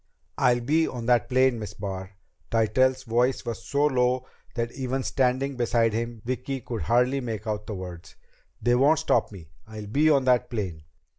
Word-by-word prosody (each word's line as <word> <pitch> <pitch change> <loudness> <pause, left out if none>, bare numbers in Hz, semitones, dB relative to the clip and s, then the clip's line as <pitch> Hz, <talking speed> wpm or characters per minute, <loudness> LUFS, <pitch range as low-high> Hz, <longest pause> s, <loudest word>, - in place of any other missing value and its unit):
"I'll 125 -2 +3
be 155 +6 +2
on 120 -2 -5
that 120 -2 +2
plane, 130 -2 +3
Miss 105 - -7
Barr." 95 -1 -6 0.4
Tytell's 130 +4 +2
voice 120 +2 +1
was 115 -2 -5
so 145 +1 +1
low 125 -2 +1 0.3
that 120 -1 -2
even 130 0 -3
standing 130 +1 0
beside 115 -2 +2
him, 115 0 -4
Vicki 130 +2 -3
could 115 -3 -5
hardly 125 - +2
make 115 -4 -5
out 105 -1 -3
the 105 - -4
words. 90 -2 -9 0.4
"They 120 - +2
won't 140 +6 +4
stop 120 -6 +1
me! 85 -7 -12 0.2
I'll 110 -1 -8
be 145 +9 +2
on 140 -3 +4
that 125 -2 +3
plane." 90 -10 -4
120 Hz, 175 wpm, -26 LUFS, 110-130 Hz, 0.4 s, won't